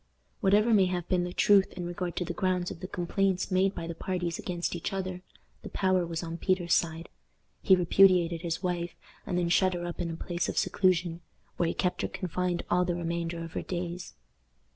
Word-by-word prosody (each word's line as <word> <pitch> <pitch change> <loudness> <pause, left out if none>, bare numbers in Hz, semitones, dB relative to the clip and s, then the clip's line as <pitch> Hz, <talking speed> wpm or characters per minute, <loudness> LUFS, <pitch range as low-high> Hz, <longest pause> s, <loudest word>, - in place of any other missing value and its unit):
Whatever 210 +4 +4
may 195 -3 +5
have 180 -1 -3
been 180 -2 +2
the 180 - -4
truth 195 +1 +4
in 180 -1 -5
regard 175 0 -4
to 180 - -1
the 175 - -4
grounds 185 -1 0
of - - -8
the 185 - -6
complaints 190 +2 0
made 190 +1 +2
by 165 - -4
the 170 - -4
parties 175 -1 -3
against 175 -1 -3
each 170 - -3
other, 185 -2 -4 0.4
the - - -8
power 185 -2 +1
was 165 0 -4
on 165 0 -5
Peter's 180 -3 +1
side. 165 0 0 0.5
He 190 - +6
repudiated 180 -2 +4
his 170 +1 -3
wife, 175 -1 -2 0.3
and 180 - -1
then 175 -1 +1
shut 185 +1 +3
her 175 0 -4
up 175 - -6
in 175 -1 -2
a 165 - -4
place 175 +1 -2
of - - -4
seclusion, 175 -3 +1 0.4
where 170 - +2
he - - -2
kept 180 - 0
her - - 0
confined 180 0 -2
all 180 +1 +3
the 175 -1 -1
remainder 170 0 -3
of 165 - -8
her - - -2
days. 175 0 -5
175 Hz, 210 wpm, -29 LUFS, 170-185 Hz, 0.5 s, He